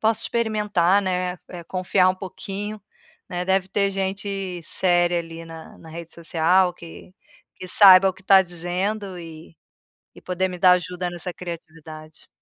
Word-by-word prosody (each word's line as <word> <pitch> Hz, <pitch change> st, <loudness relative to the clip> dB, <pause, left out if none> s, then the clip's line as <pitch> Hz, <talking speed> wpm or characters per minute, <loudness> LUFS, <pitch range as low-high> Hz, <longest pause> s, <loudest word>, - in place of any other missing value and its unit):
posso 220 Hz, +1 st, +2 dB
experimentar, 210 Hz, -5 st, +1 dB
né, 180 Hz, -1 st, -2 dB
eh, 175 Hz, -2 st, -9 dB
confiar 185 Hz, +1 st, +1 dB
um -, -, -3 dB
pouquinho, 200 Hz, +2 st, -6 dB, 0.5 s
né, 180 Hz, 0 st, -3 dB
deve 190 Hz, 0 st, +2 dB
ter 200 Hz, +1 st, +1 dB
gente 195 Hz, -1 st, -3 dB
séria 175 Hz, 0 st, +1 dB
ali, 165 Hz, 0 st, -9 dB
na 165 Hz, -1 st, -11 dB
na 165 Hz, -, -14 dB
rede 165 Hz, 0 st, -9 dB
social 175 Hz, +2 st, +2 dB
que 170 Hz, +2 st, -13 dB, 0.4 s
que 185 Hz, -, -8 dB
saiba 190 Hz, 0 st, +8 dB
o 190 Hz, -, -1 dB
que 190 Hz, -, -19 dB
tá 190 Hz, 0 st, +6 dB
dizendo 185 Hz, +3 st, -4 dB
e 165 Hz, -1 st, -11 dB, 0.6 s
e -, -, -14 dB
poder 185 Hz, +1 st, -1 dB
me 180 Hz, -, -7 dB
dar 180 Hz, 0 st, +6 dB
ajuda 180 Hz, 0 st, -2 dB
nessa 175 Hz, +1 st, -6 dB
criatividade. 160 Hz, -3 st, -10 dB
180 Hz, 155 wpm, -23 LUFS, 170-195 Hz, 0.6 s, saiba